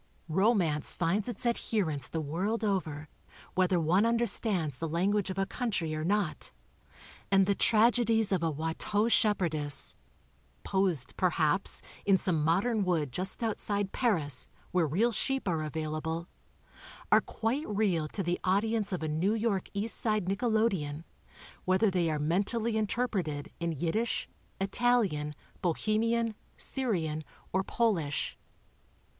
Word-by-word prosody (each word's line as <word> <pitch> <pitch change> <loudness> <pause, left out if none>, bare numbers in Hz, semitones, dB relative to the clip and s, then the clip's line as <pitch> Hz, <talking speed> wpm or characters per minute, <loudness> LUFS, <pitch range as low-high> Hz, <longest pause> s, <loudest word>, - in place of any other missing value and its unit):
Romance 180 -4 +2
finds 190 +6 0
its 245 - -5
adherents 185 - 0
the 165 - -3
world 190 +10 -2
over, 160 -8 -1 0.5
whether 185 -1 +2
one 170 +5 +3
under 230 +1 +2
stands 170 - 0
the 165 - -2
language 195 +5 +1
of 190 - -4
a 195 - +1
country 195 -10 -2
or 155 0 -2
not, 195 -1 0 0.8
and 195 -1 +5
the 200 - +2
tragedies 225 0 +3
of 185 -3 +2
a 165 - +1
Watteau 160 +8 0
shepherdess, 165 -11 +1 0.7
posed, 180 -10 0
perhaps, 165 -1 +1 0.2
in 195 -1 +4
some 170 -4 0
modern 200 +7 +2
wood 165 -7 0
just 185 - -1
outside 205 -3 -1
Paris, 155 - +1 0.2
where 175 -3 +2
real 210 +11 +2
sheep 270 +3 -1
are 165 -3 0
available, 155 +2 -3 0.8
are - - +7
quite 245 +7 -2
real 195 -7 +1
to 195 +5 -4
the 175 0 -1
audience 210 +3 +1
of 180 -3 -2
a - - -1
New 170 +8 +1
York 215 -4 -1
East 205 +3 -1
Side 215 -4 +1
nickelodeon, 195 -7 0 0.6
whether 190 +3 +3
they 175 -3 +1
are 155 - 0
mentally 205 +9 0
interpreted 200 - -1
in 170 0 -1
Yiddish, 175 - -1 0.3
Italian, 195 -8 +1 0.3
Bo 175 -2 +2
hemian, 230 +1 +1 0.2
Syrian 170 - -2 0.3
or 190 +1 +2
Polish. 190 -12 0
190 Hz, 135 wpm, -30 LUFS, 160-220 Hz, 0.8 s, are